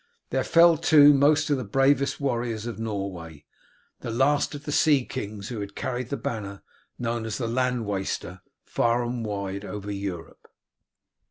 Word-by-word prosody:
There - - +1
fell, 170 0 +5
too, 145 -2 +7
most 145 +2 +3
of 145 - +3
the 130 - -3
bravest 135 +5 +2
warriors 120 -5 -2
of 120 -2 -6
Norway, 95 -8 -5 0.5
the - - -6
last 140 +5 +1
of 145 - -8
the 150 - -3
sea 145 -4 +3
kings 105 -5 -6
who 120 -3 -5
had 100 0 -7
carried 125 -1 -3
the 140 - -2
banner, 100 -3 -5 0.3
known 115 -1 -2
as 110 -1 -4
the 120 - -2
land 125 0 0
waster, 95 -2 -4 0.2
far 120 +1 +1
and 120 0 -3
wide 100 -2 -4
over 105 0 -6
Europe. 100 -4 -6
115 Hz, 165 wpm, -25 LUFS, 100-135 Hz, 0.5 s, too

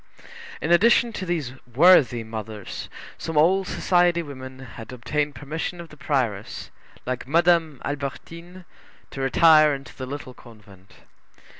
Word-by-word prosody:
In - - -1
addition 230 +6 +4
to 185 - -5
these 155 -8 -2
worthy 125 -3 +5
mothers, 110 -2 -7 0.3
some 165 -2 -4
old 185 +5 +3
society 175 -1 +2
women 130 -3 -9
had 125 -3 -11
obtained 145 +4 -2
permission 155 +6 -5
of 170 -1 -9
the 150 - -14
prioress, 120 -10 -3 0.3
like 130 0 -4
Madame 165 -1 +2
Albertine, 170 +6 -7 0.5
to 135 - -6
retire 155 +2 +5
into 135 0 -11
the 130 - -7
Little 130 -2 -7
Convent. 105 -6 -18
145 Hz, 130 wpm, -24 LUFS, 125-170 Hz, 0.5 s, worthy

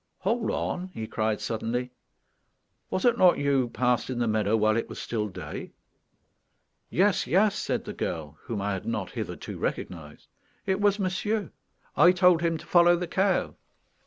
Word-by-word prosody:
"Hold 220 +4 0
on," 180 +1 -2
he 110 - -4
cried 110 -1 -1
suddenly. 120 +2 -3 1.0
"Was 185 - -1
it 240 -1 +3
not 180 -1 +6
you 140 0 +1
who 125 -2 0
passed 125 0 0
in 130 - -3
the 120 -1 0
meadow 110 0 +2
while 110 0 +3
it 115 - -2
was - - -7
still 110 -2 -2
day?" 95 - -8 1.2
"Yes, 195 +1 +2
yes," 200 +3 +3
said - - -2
the - - -5
girl, 75 -2 -4
whom 110 -4 -3
I 100 0 -1
had 95 - -5
not 105 -4 -2
hitherto - - -6
recognized; 75 -4 -5 0.4
"it 190 +1 0
was 205 -1 +3
monsieur; 205 +2 -1 0.4
I 175 +1 +6
told 180 -2 +4
him 165 -1 +1
to - - -12
follow 175 0 +5
the 175 +1 -2
cow." 190 +2 +1
130 Hz, 170 wpm, -27 LUFS, -, 1.2 s, not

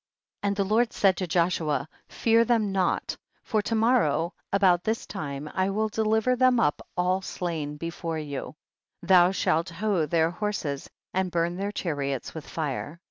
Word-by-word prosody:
42. - - -1
And 200 - +1
the 200 - +1
Lord 235 +1 +3
said 195 -2 +3
to 185 - -2
Joshua, 160 -4 +1 0.2
fear 230 0 +3
them 225 -3 +1
not, 190 -2 0 0.3
for 220 -3 0
to 225 - -2
morrow 220 - +2 0.2
about 185 -3 +4
this 220 +1 -1
time 140 -1 -5
I 190 +1 +1
will 215 +2 0
deliver 220 +3 +2
them 255 -1 +4
up 150 - +1 0.2
all 180 +2 +1
slain 160 -6 -4
before 165 0 -4
you, 145 -3 -5 0.5
thou 180 -2 +6
shall 165 -4 +1
hough 180 -2 -1
their 165 0 +2
horses 175 -8 -3 0.2
and 190 0 0
burn 170 0 0
their 200 +2 -2
chariots 140 -9 -3
with 160 -3 -8
fire. 155 +1 -4
180 Hz, 165 wpm, -27 LUFS, 160-210 Hz, 0.5 s, thou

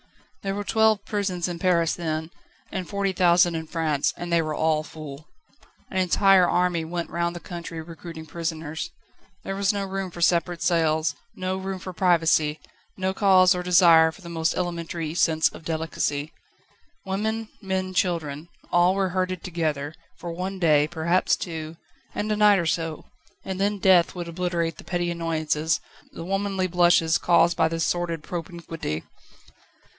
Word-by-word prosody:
There 195 0 -2
were 205 - -3
twelve 220 -1 +2
prisons 195 -5 -1
in 175 -1 -5
Paris 170 -2 +2
then, 160 -1 -3 0.4
and 185 -2 -4
forty 200 -1 -1
thousand 175 -1 +4
in 160 -1 -4
France, 155 -4 0
and 175 0 -4
they 170 - +4
were 155 -1 -3
all 155 0 +2
full. 155 -1 -10 0.6
An 190 - -3
entire 185 0 +4
army 175 -2 +1
went 170 +1 -4
round 170 0 -1
the - - -5
country 170 -2 -7
recruiting 165 0 -9
prisoners. 160 -1 -4 0.5
There 195 - -4
was 195 0 +2
no 200 -1 -2
room 195 -1 -4
for 175 - -11
separate 170 0 +1
cells, 160 -3 +2 0.2
no 185 0 -2
room 190 0 -4
for 185 0 -8
privacy, 165 -4 +2 0.4
no 190 0 -1
cause 190 -2 +5
or 180 - -3
desire 170 -3 +6
for 190 - -16
the 170 - -9
most 165 -1 0
elementary 170 -2 -3
sense 160 -2 +3
of - - -12
delicacy. 160 -2 -2 0.7
Women, 215 +3 -2
men, 190 -1 -2
children 165 -4 -1 0.2
all 175 +2 +4
were 195 -1 +1
herded 185 -1 -2
together, 155 -4 -2 0.2
for 170 - -6
one 185 +3 -4
day, 150 -4 +4
perhaps 170 +2 +1
two, 160 -2 -6 0.4
and 215 +1 -2
a - - +2
night 210 -1 +5
or 170 - 0
so, 165 -1 -2 0.4
and 190 0 -4
then 205 +1 +1
death 185 -3 +4
would 175 -1 -5
obliterate 170 -2 -2
the - - -9
petty 175 -1 -1
annoyances, 160 -2 0 0.3
the 165 - -8
womanly 195 0 -1
blushes 175 -2 +3
caused 170 -1 +4
by 160 - +3
this 165 -1 -1
sordid 170 -2 -1
propinquity. 165 - -5
170 Hz, 160 wpm, -25 LUFS, 160-185 Hz, 0.7 s, desire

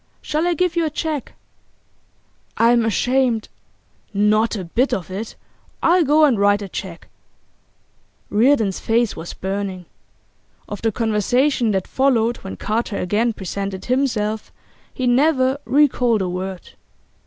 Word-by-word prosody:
Shall 310 +3 -1
I 350 - +1
give 360 0 0
you 340 - +2
a 315 - 0
cheque?' 305 -2 -4 1.2
'I'm 235 0 +4
ashamed 245 +1 +1 0.3
' - - -40
'Not 215 +3 +2
a 195 - -4
bit 235 +10 0
of 185 -1 -7
it! 210 +4 -5 0.5
I'll 350 +1 +4
go 305 +1 +5
and 250 -8 +2
write 205 0 +3
the 200 - -6
cheque.' 180 -2 -7 1.2
Reardon's 220 -3 +3
face 230 0 +1
was 165 +1 -7
burning. 190 -1 -4 0.8
Of 205 - -7
the 225 - +1
conversation 235 +4 +1
that 190 -1 -1
followed 240 -3 +1
when 95 - -8
Carter 215 -1 -2
again 215 +6 0
presented 195 -1 -5
himself 230 -5 -1 0.4
he 255 - -3
never 260 +1 +3
recalled 250 -6 +3
a 180 - -2
word. 185 0 -5
225 Hz, 135 wpm, -20 LUFS, 200-265 Hz, 1.2 s, go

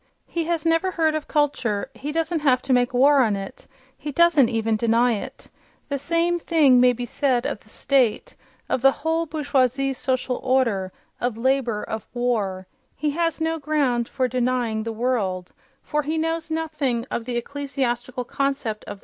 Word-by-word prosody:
He 335 -1 -3
has 335 -1 -1
never 330 +3 +2
heard 320 -3 +1
of 310 -1 -3
culture; 275 -9 0
he 290 +2 -5
doesn't 325 +1 -1
have 255 -4 +2
to 270 - +1
make 245 -1 +3
war 275 +3 +5
on 220 -5 +2
it—he 265 +8 -9
doesn't 310 -4 +4
even 225 -1 0
deny 235 +2 +3
it.... 210 - -7 0.4
The 280 -1 -2
same 335 +4 +1
thing 300 -7 +4
may 250 0 +6
be 245 0 -4
said 255 -1 0
of - - -2
the 215 - -23
state, 255 -2 +1 0.3
of 255 - -1
the 270 - +7 0.2
whole 325 +1 +1
bourgeoise 275 -3 +1
social 255 0 -1
order, 235 -8 +1 0.3
of 240 -2 -2
labour, 245 -3 0
of 220 -1 -5
war—he 220 +3 -2
has 330 +2 -1
no 325 0 -1
ground 275 -6 0
for 255 - 0
denying 245 -3 0
"the 225 +1 -4
world," 215 -6 -1 0.3
for 300 -1 -1
he 310 +2 -2
knows 325 0 -2
nothing 305 -7 -1
of 230 - -2
the 245 -1 -2
ecclesiastical 255 -2 -3
concept 270 -4 -2
of - - -27
"the - - -4
world".... - - -20
260 Hz, 175 wpm, -23 LUFS, 240-305 Hz, 0.4 s, the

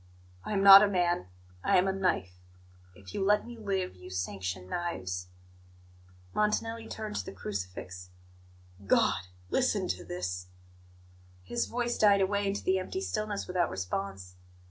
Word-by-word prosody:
I - - -4
am 195 -1 +1
not 195 0 +12
a 210 - +5
man; 175 - +1 0.4
I - - +4
am 180 +1 +3
a - - +2
knife. 95 - -1 0.6
If 95 -1 -13
you - - -1
let 210 +2 +3
me 240 - -8
live, 195 - -2
you 90 0 -12
sanction 90 0 -4
knives." 95 - -3 1.1
Montanelli 225 +2 0
turned 215 -1 -5
to 95 - -3
the - - -6
crucifix. 90 -2 -6 0.8
"God! 90 - +3 0.2
Listen - - +1
to 90 -1 -2
this 90 +1 -4 0.5
" 90 0 -27
His 240 - 0
voice 240 0 -2
died 205 -2 +6
away 200 +1 +1
into 195 +1 -2
the 190 0 +2
empty 280 - -4
stillness 215 - -2
without 180 -1 0
response. 95 -1 -4
175 Hz, 150 wpm, -30 LUFS, -, 1.1 s, not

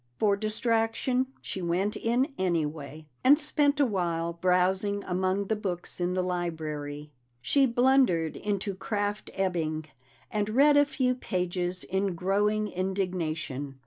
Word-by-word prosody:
For 205 -2 +3
distraction, 225 +4 0
she 190 - -5
went 180 +4 0
in 250 +5 0
anyway, 155 - -2 0.2
and 280 +3 +7
spent 295 -1 +2
a 285 - +5
while 170 -6 -1
browsing 185 +3 +1
among 185 +2 0
the 220 - 0
books 185 -4 -4
in 180 +1 0
the 185 - +1
library. 155 -5 -4 0.3
She 275 - +3
blundered 245 - +3
into 200 -1 -2
Kraft 205 +2 -3
Ebing, 165 -5 -1 0.5
and 210 -1 -1
read 285 +6 +5
a 290 0 +6
few 255 -3 0
pages 180 -5 -2
in 190 -1 -1
growing 205 +4 +1
indignation. 170 -8 -3
190 Hz, 130 wpm, -28 LUFS, 175-215 Hz, 0.5 s, and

